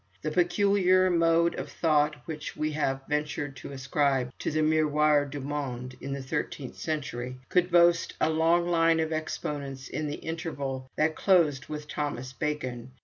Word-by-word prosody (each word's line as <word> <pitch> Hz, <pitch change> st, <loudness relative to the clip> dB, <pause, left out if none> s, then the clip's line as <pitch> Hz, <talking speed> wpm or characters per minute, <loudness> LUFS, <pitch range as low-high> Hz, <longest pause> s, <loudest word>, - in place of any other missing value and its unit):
The 155 Hz, -, -1 dB
peculiar 185 Hz, +1 st, +3 dB
mode 170 Hz, 0 st, +3 dB
of -, -, -6 dB
thought 150 Hz, -2 st, +2 dB
which 155 Hz, -3 st, -6 dB
we 155 Hz, 0 st, -1 dB
have 135 Hz, -3 st, -1 dB
ventured 150 Hz, -1 st, -2 dB
to -, -, -8 dB
ascribe 135 Hz, -1 st, 0 dB
to -, -, -1 dB
the 155 Hz, 0 st, +1 dB
'Miroir 150 Hz, -1 st, +3 dB
du 145 Hz, +1 st, -6 dB
Monde' 130 Hz, -3 st, -4 dB
in 140 Hz, -, -5 dB
the 135 Hz, -1 st, -4 dB
thirteenth 130 Hz, 0 st, -4 dB
century, 130 Hz, -5 st, -4 dB
could 180 Hz, -1 st, +2 dB
boast 170 Hz, -1 st, +4 dB
a 160 Hz, -, +2 dB
long 165 Hz, +2 st, +3 dB
line 165 Hz, -1 st, +3 dB
of 160 Hz, 0 st, 0 dB
exponents 145 Hz, -3 st, -4 dB
in 155 Hz, -, -3 dB
the 145 Hz, -, -3 dB
interval 140 Hz, -6 st, -5 dB
that 155 Hz, +1 st, +1 dB
closed 165 Hz, -8 st, +3 dB
with 150 Hz, -1 st, -6 dB
Thomas 130 Hz, -4 st, -4 dB
Becon. 130 Hz, -5 st, -3 dB
150 Hz, 160 wpm, -28 LUFS, 140-165 Hz, -, boast